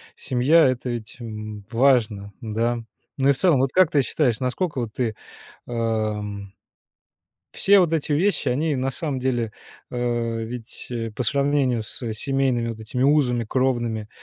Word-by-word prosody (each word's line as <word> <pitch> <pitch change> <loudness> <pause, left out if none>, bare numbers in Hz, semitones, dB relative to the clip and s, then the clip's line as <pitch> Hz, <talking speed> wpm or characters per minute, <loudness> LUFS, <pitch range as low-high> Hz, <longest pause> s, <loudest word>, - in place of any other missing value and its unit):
Семья- 135 +6 +4
это 130 0 -1
ведь, 115 -3 -6
м, 110 -3 -7
важно, 115 -5 +2
да, 115 +2 -1 0.4
ну, 135 0 +3
и, - - +8
в - - -10
целом, 165 -6 +4
вот 135 0 +1
как 185 -3 +5
ты 145 -3 +3
считаешь, 125 -5 +1
насколько 135 +4 -1
вот 110 -3 -5
ты, 115 -3 -1 0.5
эм 105 -4 -2 1.0
все 200 0 +5
вот 170 -3 +2
эти 155 -1 -1
вещи, 190 +8 +2
они, 150 +4 +1
на 130 +1 -1
самом 145 0 -3
деле, 120 -4 -1 0.4
а, - - -6 0.5
ведь 120 +1 -7 0.2
по 125 - -1
сравнению 140 -3 +1
с 115 +1 -5
семейными 130 0 0
вот 115 -1 -6
этими 110 +3 -4
узами 130 -5 +3
кровными, 120 -3 0
125 Hz, 150 wpm, -23 LUFS, 110-140 Hz, 1.0 s, и